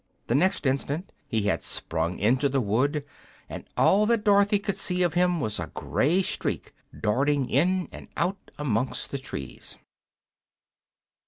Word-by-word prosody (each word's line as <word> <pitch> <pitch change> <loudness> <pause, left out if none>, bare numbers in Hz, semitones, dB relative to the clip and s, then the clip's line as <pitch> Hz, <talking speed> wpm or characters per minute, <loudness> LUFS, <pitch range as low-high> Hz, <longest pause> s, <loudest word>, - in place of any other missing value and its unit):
The - - -1
next 165 +4 +2
instant 140 +6 -1 0.2
he 110 -2 0
had 100 - +1
sprung 80 +2 -2
into 125 +7 +2
the 135 0 +1
wood, 130 +7 0 0.4
and - - -8
all 210 +2 +4
that 230 -2 +2
Dorothy 205 0 +4
could 200 -1 -2
see 180 -2 0
of 175 -3 +1
him 180 0 +2
was 110 -6 -2
a - - -4
gray 175 +7 +1
streak - - -2 0.3
darting 135 +5 +1
in 180 +6 +2
and - - -10
out 185 +3 -2
amongst 130 -4 -1
the 140 - -3
trees. 70 - -7
145 Hz, 150 wpm, -26 LUFS, 125-185 Hz, 0.4 s, all